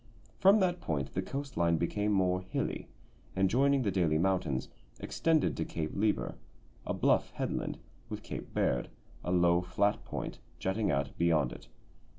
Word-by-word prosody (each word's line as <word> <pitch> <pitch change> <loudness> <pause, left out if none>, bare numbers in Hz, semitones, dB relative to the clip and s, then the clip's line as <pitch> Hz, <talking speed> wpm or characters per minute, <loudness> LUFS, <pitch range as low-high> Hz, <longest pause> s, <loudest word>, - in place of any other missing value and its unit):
From 195 +3 +7
that 180 -1 +1
point 70 -4 -2
the 95 - 0
coast 140 +6 -5
line 85 -1 +3
became 105 +5 0
more 95 -2 +2
hilly, 95 - -3 0.5
and, 95 0 +2
joining 140 +2 +3
the 100 - +1
Daly 85 -5 +2
mountains, 85 -7 0 0.3
extended 160 -2 +1
to - - -1
Cape 80 -2 -3
Lieber, 105 +1 0 0.5
a - - 0
bluff - - +3
headland, - - -2 0.3
with - - -5
Cape - - -6
Baird, 60 - 0 0.3
a 90 - -2
low, 85 -1 +4
flat 95 +3 0
point, - - -5 0.2
jutting 100 +3 0
out 70 -2 0
beyond 80 -6 +3
it. - - -12
90 Hz, 160 wpm, -31 LUFS, 80-105 Hz, 0.5 s, From